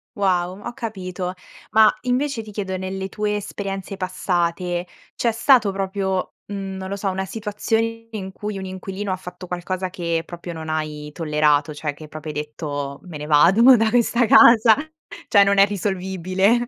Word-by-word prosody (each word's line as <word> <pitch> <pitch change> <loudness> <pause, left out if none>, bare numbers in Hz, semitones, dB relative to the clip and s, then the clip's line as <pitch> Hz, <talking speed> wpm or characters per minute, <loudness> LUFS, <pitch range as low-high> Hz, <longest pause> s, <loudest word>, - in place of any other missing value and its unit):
Wow, 185 -2 0
ho 240 - -5
capito. 190 -7 -5 0.4
Ma 220 -1 +6
invece 255 0 0
ti 215 -1 -11
chiedo, 195 -2 -3
nelle 190 +1 -4
tue 210 +1 -1
esperienze 195 -1 -5
passate 180 -1 -1 0.3
c'è 235 - +1
stato 230 -2 +4
proprio, 190 -1 -2
mhmm, 195 -1 -5
non 190 0 -6
lo 200 - -2
so, 200 0 -2
una 190 0 -2
situazione 225 +2 -2
in 190 -3 -5
cui 210 +1 -5
un 190 - -5
inquilino 190 +1 -5
ha - - +1
fatto 180 0 -9
qualcosa 185 +1 -3
che 170 -2 -2
proprio 170 0 -8
non 160 -1 -7
hai 150 -1 -3
tollerato, 150 -2 +2
cioè 150 0 -3
che 155 +2 -11
proprio 155 0 -7
hai 150 - -7
detto: 145 -2 -5
"Me 175 -4 -8
ne 150 0 -6
vado 170 +8 +5
mo' 255 0 +9
da 225 0 +2
questa 240 +1 +3
casa, 225 0 +7 0.5
cioè 200 -2 +6
non 200 0 +3
è 195 - +8
risolvibile". 190 +3 0
190 Hz, 175 wpm, -22 LUFS, 175-210 Hz, 0.5 s, mo